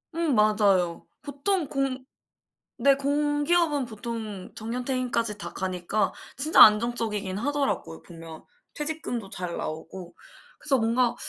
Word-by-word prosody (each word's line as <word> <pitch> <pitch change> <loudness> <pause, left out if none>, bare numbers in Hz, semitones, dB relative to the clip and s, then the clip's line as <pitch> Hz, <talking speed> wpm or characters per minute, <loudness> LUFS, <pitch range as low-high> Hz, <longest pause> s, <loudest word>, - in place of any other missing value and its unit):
음 330 -6 +1
맞아요. 205 -5 +2 0.2
보통 300 +4 -1
공 270 -2 -2 0.8
네 280 - +5
공기업은 290 +1 +1
보통 220 -3 -7
정년 235 +3 -4
퇴임까지 235 -5 -1
다 - - -6
가니까 185 +2 -1 0.2
진짜 300 +4 +5
안정적이긴 210 -3 +4
하더라고요 275 - -2
보면. 165 -2 -11 0.3
퇴직금도 295 -9 -3
잘 180 -1 -4
나오고. 170 +3 -7 0.5
그래서 280 -4 +2
뭔가 235 +1 +1
235 Hz, 270 characters per minute, -26 LUFS, 200-280 Hz, 0.8 s, 네